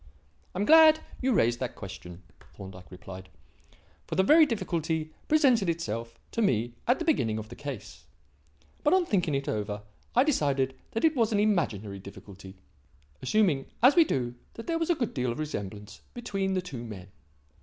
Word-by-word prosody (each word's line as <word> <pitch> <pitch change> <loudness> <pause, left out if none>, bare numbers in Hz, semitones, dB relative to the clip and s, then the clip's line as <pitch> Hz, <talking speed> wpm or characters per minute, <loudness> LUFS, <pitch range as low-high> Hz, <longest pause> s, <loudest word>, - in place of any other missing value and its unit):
"I - - -2
am 205 - +1
glad 315 +1 +8 0.2
you 260 0 +1
raised 120 - +2
that 125 -2 -4
question," 90 -2 -9 0.3
Thorndyke 95 -2 -11
replied, 95 0 -10 0.8
"for - - -4
that 190 - +4
very 310 +7 +6
difficulty 165 - -2
presented 255 - +4
itself 115 -8 -3
to 230 - -1
me 120 - +1
at 245 - +4
the 335 - -4
beginning 115 - +1
of 110 0 -7
the 120 - -9
case. 140 -7 -8 0.8
But 300 +5 +4
on 370 -2 +2
thinking 180 - 0
it 140 0 -2
over, 105 -1 -3 0.3
I 250 - +6
decided 140 - +1 0.2
that 225 - +1
it 320 -1 +3
was 230 -3 +2
an 205 - +2
imaginary 110 - 0
difficulty, 95 0 -12 0.7
assuming, 155 -3 +2 0.2
as 260 +3 +7
we 340 - +8
do, 125 - -2 0.2
that 230 - -8
there 330 -1 -1
was 330 - -1
a 345 - +4
good 240 -7 -2
deal 125 -2 -1
of 115 - -5
resemblance 105 -8 -6
between 195 -5 -2
the 185 - -1
two 135 -10 -7
men. 100 -5 -9
150 Hz, 175 wpm, -28 LUFS, -, 0.8 s, glad